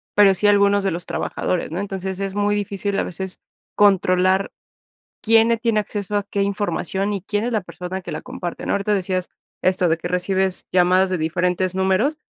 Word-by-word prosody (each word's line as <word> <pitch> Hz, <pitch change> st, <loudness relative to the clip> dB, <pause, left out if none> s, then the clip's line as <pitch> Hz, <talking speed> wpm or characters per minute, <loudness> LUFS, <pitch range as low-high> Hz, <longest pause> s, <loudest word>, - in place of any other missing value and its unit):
pero 200 Hz, -2 st, +6 dB
sí 200 Hz, +3 st, +2 dB
algunos 200 Hz, -1 st, +4 dB
de 195 Hz, -, +1 dB
los 170 Hz, +1 st, -4 dB
trabajadores, 180 Hz, -3 st, -2 dB
¿no? 175 Hz, -, -3 dB
Entonces 190 Hz, -1 st, -4 dB
es 195 Hz, 0 st, -3 dB
muy 205 Hz, 0 st, +1 dB
difícil 200 Hz, 0 st, -2 dB
a -, -, +1 dB
veces 190 Hz, +1 st, -5 dB, 0.3 s
controlar 190 Hz, -1 st, +3 dB, 0.7 s
quién 225 Hz, +1 st, +4 dB
le 230 Hz, -, +3 dB
tiene 230 Hz, -2 st, +1 dB
acceso 205 Hz, -1 st, -4 dB
a 205 Hz, -, +1 dB
qué 200 Hz, 0 st, -3 dB
información 200 Hz, 0 st, -1 dB
y 195 Hz, -, -3 dB
quién 205 Hz, +2 st, -2 dB
es 245 Hz, -, -2 dB
la 215 Hz, -, +1 dB
persona 180 Hz, +1 st, -6 dB
que -, -, -8 dB
la -, -, -4 dB
comparte, 175 Hz, -1 st, -6 dB
¿no? -, -, 0 dB
Ahorita 200 Hz, +1 st, 0 dB
decías 185 Hz, -2 st, -1 dB, 0.3 s
esto, 185 Hz, -1 st, +2 dB
de 160 Hz, -, +2 dB
que 170 Hz, -, -5 dB
recibes 185 Hz, +1 st, -1 dB
llamadas 185 Hz, +1 st, +4 dB
de 185 Hz, -, 0 dB
diferentes 180 Hz, +3 st, 0 dB
números, 190 Hz, +11 st, +1 dB
190 Hz, 195 wpm, -21 LUFS, 185-205 Hz, 0.7 s, pero